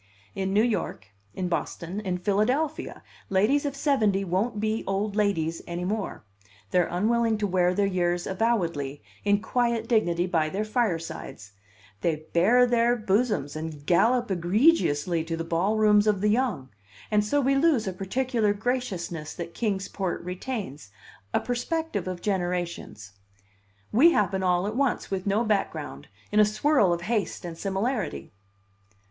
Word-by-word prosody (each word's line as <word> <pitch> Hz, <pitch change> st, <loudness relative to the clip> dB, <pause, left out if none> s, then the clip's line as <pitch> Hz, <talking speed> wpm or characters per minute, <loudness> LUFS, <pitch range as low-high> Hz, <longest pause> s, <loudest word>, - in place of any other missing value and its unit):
In 190 Hz, -1 st, -2 dB
New 210 Hz, +2 st, +4 dB
York, 215 Hz, -, -2 dB, 0.3 s
in 185 Hz, -, -2 dB
Boston, 175 Hz, +2 st, -3 dB
in 185 Hz, -4 st, -2 dB
Philadelphia, 235 Hz, -, -1 dB, 0.3 s
ladies 230 Hz, +10 st, +2 dB
of 280 Hz, -, -4 dB
seventy 220 Hz, -9 st, +2 dB
won't 205 Hz, +5 st, -1 dB
be 220 Hz, +1 st, -1 dB
old 200 Hz, +1 st, -1 dB
ladies 165 Hz, -6 st, 0 dB
any 175 Hz, +1 st, -4 dB
more; 205 Hz, -, -3 dB, 0.5 s
they're 180 Hz, -1 st, +3 dB
unwilling 225 Hz, +4 st, +1 dB
to 210 Hz, -, -1 dB
wear 180 Hz, -2 st, +2 dB
their 205 Hz, -, +2 dB
years 175 Hz, -2 st, 0 dB
avowedly, 170 Hz, -, -1 dB, 0.2 s
in 205 Hz, +1 st, +2 dB
quiet 235 Hz, -1 st, 0 dB
dignity 175 Hz, -7 st, +2 dB
by 160 Hz, -4 st, +1 dB
their 200 Hz, +6 st, -2 dB
firesides; 165 Hz, -, -3 dB, 0.5 s
they 155 Hz, -2 st, -1 dB
bare 230 Hz, +9 st, +5 dB
their 240 Hz, 0 st, +3 dB
bosoms 210 Hz, -, 0 dB
and 155 Hz, -2 st, -6 dB
gallop 235 Hz, +7 st, +3 dB
egregiously 175 Hz, -, +2 dB
to 165 Hz, 0 st, -4 dB
the 165 Hz, -, -3 dB
ball 170 Hz, +6 st, 0 dB
rooms 210 Hz, -1 st, +4 dB
of 205 Hz, -3 st, +2 dB
the 210 Hz, -, +3 dB
young; 215 Hz, -, 0 dB, 0.4 s
and 210 Hz, -1 st, +3 dB
so 250 Hz, +8 st, +1 dB
we 275 Hz, 0 st, +2 dB
lose 275 Hz, -4 st, +3 dB
a 190 Hz, -, -2 dB
particular 215 Hz, +3 st, 0 dB
graciousness 200 Hz, -9 st, -3 dB
that 170 Hz, -1 st, -6 dB
Kings 200 Hz, -4 st, -1 dB
Port 190 Hz, -4 st, -3 dB
retains, 180 Hz, -, -5 dB, 0.4 s
a -, -, +2 dB
perspective 245 Hz, -, -2 dB
of 180 Hz, -1 st, -5 dB
generations. 175 Hz, -, -3 dB, 0.8 s
We 315 Hz, +10 st, +6 dB
happen 195 Hz, -2 st, +1 dB
all 180 Hz, 0 st, +2 dB
at 210 Hz, +2 st, -3 dB
once, 275 Hz, -5 st, 0 dB
with 190 Hz, 0 st, -2 dB
no 205 Hz, +4 st, +2 dB
background, 200 Hz, -, -2 dB, 0.2 s
in 210 Hz, -, +3 dB
a -, -, +8 dB
swirl 215 Hz, -1 st, +3 dB
of 170 Hz, 0 st, -1 dB
haste 205 Hz, -2 st, -2 dB
and 170 Hz, -1 st, -6 dB
similarity. 200 Hz, +6 st, -2 dB
200 Hz, 150 wpm, -26 LUFS, 175-230 Hz, 0.8 s, a